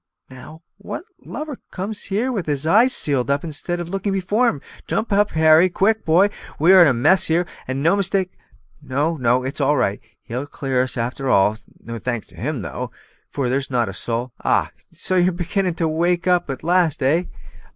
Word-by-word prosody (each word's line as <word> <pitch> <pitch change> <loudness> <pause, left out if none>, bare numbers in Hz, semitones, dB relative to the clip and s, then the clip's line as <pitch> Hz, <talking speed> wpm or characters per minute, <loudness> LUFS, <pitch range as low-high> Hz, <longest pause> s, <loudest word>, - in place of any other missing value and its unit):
Now, 155 +6 -12 0.2
what 200 - -6 0.2
lubber 300 -3 -6
comes 205 +3 -5
here 220 +7 -1
with 195 -9 -3
his 145 0 -1
eyes 225 +10 +5
sealed 140 - 0
up 140 +1 +1
instead 170 +2 -2
of 175 - -4
looking 195 +2 -2
before 205 +6 +1
him? 145 - -4 0.3
Jump 220 -1 -1
up, 205 +1 +3
Harry; 160 +3 +5
quick, 215 +5 +1
boy! 180 +6 +4 0.3
we 170 +5 +5
are 190 - +8
in 170 - +7
a 135 - +3
mess 155 +10 +3
here, 170 +2 +1 0.2
and 130 +2 -3
no 170 +5 +4
mistake. 195 -1 0 0.5
No, 145 +4 -1
no; 125 -2 +1
it's 135 +3 -4
all 145 +2 +2
right, 100 -4 0 0.2
he'll 125 +5 -5
clear 135 -3 -1
us 130 0 -1
a'ter 125 +3 -2
all. 105 +1 +3 0.2
No 115 0 -7
thanks 120 -1 -3
to - - -15
him 120 - -3
though, - - -5 0.4
for 135 -3 -2
there's 135 +3 -1
not 120 -5 0
a - - -6
soul 120 +5 -4
ah! - - +1 0.2
so 185 - -2
you're 180 +1 +3
beginning 180 +1 -2
to 165 -1 0
wake 170 +2 0
up 180 -3 +2
at 135 +1 -5
last, 170 -4 +1
eh!" 160 +7 +2
160 Hz, 200 wpm, -21 LUFS, 130-185 Hz, 0.5 s, are